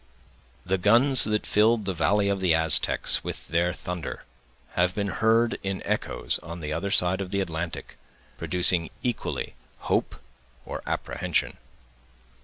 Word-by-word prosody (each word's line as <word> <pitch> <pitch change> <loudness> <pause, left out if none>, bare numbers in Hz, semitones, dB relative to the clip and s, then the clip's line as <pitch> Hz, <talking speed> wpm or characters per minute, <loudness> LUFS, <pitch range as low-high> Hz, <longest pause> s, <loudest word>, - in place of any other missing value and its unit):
The 95 +1 0
guns 120 +7 +5
that 105 0 -1
filled 110 0 +3
the 95 - -1
valley 100 +4 +1
of 100 -1 0
the 90 -4 +3
Aztecs 80 -3 +2
with - - -7
their 85 +2 +1
thunder, 90 -2 -6 0.5
have 90 +1 +1
been 100 -1 -1
heard 115 +3 +2
in 95 -1 -4
echoes - - -2
on 85 +1 -8
the 75 -1 -4
other 95 +5 -2
side 95 0 +1
of 95 - -5
the 100 +1 -1
Atlantic, 85 -3 -5 0.4
producing 90 -2 +2
equally 120 -3 -3 0.3
hope - - -1 0.5
or - - -6
apprehension. - - -2
95 Hz, 140 wpm, -26 LUFS, 85-105 Hz, 0.5 s, guns